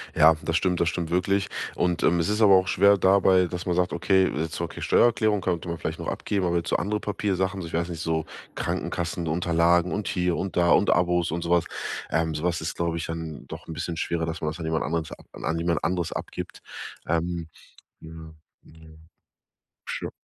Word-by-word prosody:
Ja, 80 +1 +7
das 80 - -2
stimmt, 90 0 +1
das 85 - +2
stimmt 85 -1 -2
wirklich. 95 +3 +1 0.3
Und, 90 -2 0
ähm, 85 - +3
es 85 +4 0
ist 105 +1 0
aber 100 -3 +7
auch 95 0 +3
schwer 100 +1 +5
dabei, 95 -1 +4
dass 90 +1 -5
man 90 - 0
sagt: 90 0 +1
„Okay, 95 +2 +3
jetzt 80 +1 -3
okay, 85 - -5
Steuererklärung 110 -3 +3
könnte 90 -1 -2
man 85 - -3
vielleicht 80 -1 -4
noch - - -5
abgeben“, 100 -3 -1
aber 85 - 0
jetzt 85 - -1
so - - +2
andere 105 +1 -1
Papiersachen, 95 -2 -1
so, 85 - -6
ich - - -11
weiß 85 +1 -1
nicht, 85 -2 -5
so 80 -1 -1 0.3
Krankenkassenunterlagen 85 +1 0
und 105 0 -2
hier 90 -2 0
und 95 - -3
da 85 0 +3
und - - +4
Abos 90 -1 +2
und 85 - -2
so 85 - -4
was. 85 -1 +3 0.4
Ähm. 80 -1 0
So 75 - -4
was 85 -2 0
ist, 80 - -3
glaube 85 -1 -1
ich, 85 - -3
dann 80 -2 -6
doch - - -9
'n 80 - -5
bisschen 85 0 -4
schwerer, 80 0 -1
dass 80 +1 -4
man 75 - -1
das 85 - -9
an 80 - -4
jemand 80 0 0
anderes 80 0 -2
ab - - -11
an 80 +2 -2
jemand 85 -1 0
anderes 90 -2 -1
abgibt. - - -6 0.5
Ähm. 85 0 -1 0.5
Ja. 80 0 -11 0.3
Ja. 80 0 -16 1.0
Scho - - -4
85 Hz, 215 wpm, -25 LUFS, 80-90 Hz, 1.0 s, Ja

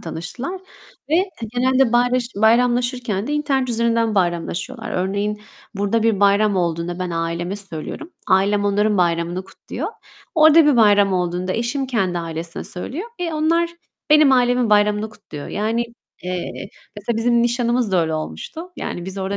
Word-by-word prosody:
tanıştılar 180 - -6 0.5
ve - - +3 0.4
genelde 255 0 +3
bayraş 245 0 +2
bayramlaşırken 240 -1 +2
de 290 - -2
internet 280 -3 0
üzerinden 230 -1 +1
bayramlaşıyorlar. 190 +7 -2
Örneğin, 200 +3 -1 0.3
burada 205 +3 0
bir 220 -3 +2
bayram 200 0 +4
olduğunda 170 0 -1
ben 180 -1 -3
aileme 170 +3 -2
söylüyorum, 200 - -6 0.2
ailem 200 +2 +3
onların 205 +1 +2
bayramını 175 +1 0
kutluyor. 195 - -6 0.5
Orada 315 0 +7
bir 285 -4 +4
bayram 205 -3 +5
olduğunda 180 +1 -1
eşim 240 +4 -1
kendi 195 -9 0
ailesine 165 0 -5
söylüyor 320 - -6
ve 335 -3 -2
onlar 335 +2 +1 0.4
benim 300 -2 +6
ailemin 245 -2 +3
bayramını 210 +1 +3
kutluyor. 150 -8 -10
Yani, 225 +4 -1 0.4
eee, 180 +2 -5 0.3
mesela, 215 +3 -3
bizim 235 +1 +2
nişanımız 240 -2 +1
da 180 -3 +4
öyle 160 0 -1
olmuştu. 155 - -6
Yani, 175 - -5
biz 190 +1 -6
orada 195 +1 -2
210 Hz, 145 wpm, -20 LUFS, 185-245 Hz, 0.5 s, Orada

